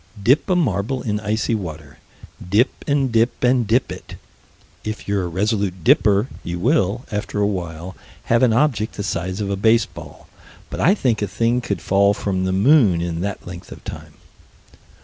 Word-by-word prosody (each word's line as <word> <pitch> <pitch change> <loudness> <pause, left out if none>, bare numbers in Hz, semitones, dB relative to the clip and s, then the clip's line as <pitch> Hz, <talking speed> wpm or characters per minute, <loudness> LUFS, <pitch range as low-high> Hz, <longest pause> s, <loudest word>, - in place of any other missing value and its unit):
Dip 135 - +3
a 185 - +3
marble 130 - 0
in 105 -3 -1
icy 110 +2 -1
water. 80 -8 -6 0.5
Dip 110 +8 +3 0.2
and 140 -3 +1
dip 115 +2 +1
and 125 -2 +3
dip 120 +5 +1
it. - - -9 0.7
If 110 0 -6
you're 100 -2 0
a - - -3
resolute 95 0 -1
dipper, 105 +6 +4 0.2
you 85 0 -4
will, 115 - +1
after 105 0 -3
a 100 - +3
while, 90 -2 -4 0.3
have 115 0 +2
an 125 -3 +4
object 115 -3 +1
the 100 - -4
size 95 +2 -3
of 100 -1 -2
a - - 0
baseball 110 +3 0 0.4
but - - -5
I 185 +7 +4
think 120 - 0
a 105 - 0
thing 115 +5 0
could 100 -7 -4
fall 100 +1 +3
from 95 -2 -2
the 95 - 0
moon 100 - +4
in 85 -1 -3
that 100 +1 -4
length 90 0 -9
of - - -11
time. - - -9
105 Hz, 180 wpm, -21 LUFS, 95-120 Hz, 0.7 s, dipper